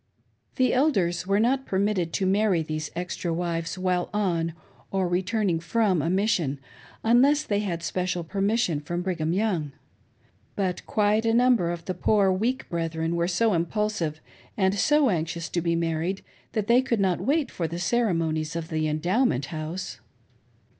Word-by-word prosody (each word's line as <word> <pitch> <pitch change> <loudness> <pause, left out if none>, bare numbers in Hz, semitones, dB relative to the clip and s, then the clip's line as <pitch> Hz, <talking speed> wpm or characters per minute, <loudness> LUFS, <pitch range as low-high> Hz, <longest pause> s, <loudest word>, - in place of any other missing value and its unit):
The 255 -2 +2
Elders 190 - +1
were 200 +1 +2
not 260 +4 +1
permitted 190 -3 0
to 190 - 0
marry 195 -3 +2
these 155 0 -4
extra 175 0 -3
wives 165 +1 -2
while 185 -1 0
on, 170 -6 0 0.4
or 190 -2 0
returning 185 0 0
from, 185 0 +1
a 165 - -1
mission, 180 -8 +1 0.4
unless 270 +6 +4
they 205 -1 0
had 175 -5 -3
special 180 0 -2
permission 195 -1 0
from 175 +4 -4
Brigham 170 -4 -1
Young. 180 -7 0 0.8
But 185 -3 -1
quite 210 +1 +2
a 225 0 +2
number 240 -7 +4
of 170 -1 -5
the 185 - -2
poor 195 +2 +2
weak 235 +8 -1
brethren 165 -1 -2
were 170 0 +1
so 210 +4 +2
impulsive 170 -2 -1 0.4
and 190 -2 +2
so 285 +5 +3
anxious 165 -1 -2
to 170 - -1
be 170 0 0
married, 165 +3 -1 0.3
that 215 -3 0
they 235 +3 +5
could 240 -4 -1
not 190 -3 +1
wait 295 +1 +1
for 170 - -2
the 170 +2 -5
ceremonies 165 -6 0
of 165 -1 -4
the 155 -1 0
Endowment 155 - +1
House. 160 +4 -5
180 Hz, 160 wpm, -26 LUFS, 165-215 Hz, 0.8 s, they